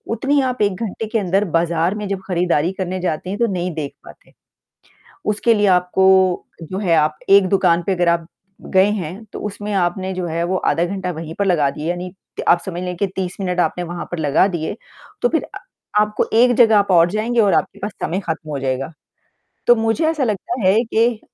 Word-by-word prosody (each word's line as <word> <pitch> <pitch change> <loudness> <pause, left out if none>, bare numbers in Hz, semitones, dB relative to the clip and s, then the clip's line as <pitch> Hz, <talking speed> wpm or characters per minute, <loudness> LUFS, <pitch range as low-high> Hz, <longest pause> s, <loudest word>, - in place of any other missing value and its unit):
उतनी 280 +5 +1
आप 255 -2 -2
1 205 -2 +2
घंटे 225 +1 -4
के 225 +1 0
अंदर 195 +1 +1
बाज़ार 170 +3 0
में 210 -1 -4
जब 195 -1 -2
खरीदारी 175 -2 +1
करने 185 0 -3
जाते 180 0 -3
हैं, 205 - -4
तो 235 - +3
नहीं 180 0 -2
देख 150 -3 -5
पाते। - - -16 0.9
उसके 215 +2 +2
लिए 205 -1 +2
आपको 185 0 +3 0.2
जो 185 +4 -6
है, 175 -5 +2
आप 155 0 +2
एक 195 -1 +6
दुकान 175 -3 +3
पे - - +2
अगर 175 0 +1
आप 170 -1 0 0.5
गए 190 +2 +5
हैं 190 +1 -5
तो - - -6
उसमें 205 0 -5
आपने 185 +1 -1
जो 185 -1 -3
है 165 +1 -2
वो 185 +2 -1 0.2
आधा 165 - 0
घंटा 190 0 -3
वहीं 160 -1 -7
पर 200 - +2
लगा 155 -7 +2
दिए, 150 +4 -5
यानी 180 +1 -4 0.3
त - - -2
आप 170 - +5
समझ 180 -1 -5
लें 180 0 -4
कि 200 - +1
30 185 -2 -3
मिनट 180 -2 -2
आपने 175 +1 0
वहाँ 175 0 -5
पर 175 - -3
लगा 150 +4 +3
दिए। 170 -2 -3 0.5
तो 485 - +3
फिर - - 0
अ, - - -10 0.4
आपको 210 0 0
एक 245 +1 +5
जगह 225 -3 +6
आप 200 -1 +2
और 170 -1 +5
जाएँगे 225 +3 0
और 200 -3 +3
आपके - - 0
पास 205 +2 -4
समय 180 +4 -1
खत्म 160 -1 -4
हो 145 -2 -3
जाएगा। 135 +2 -2 0.8
तो 240 - +7
मुझे 225 +8 0
ऐसा 310 -4 -1
लगता 235 +3 -3
,है 190 - +5
कि 230 0 +1
185 Hz, 215 wpm, -19 LUFS, 170-210 Hz, 0.9 s, तो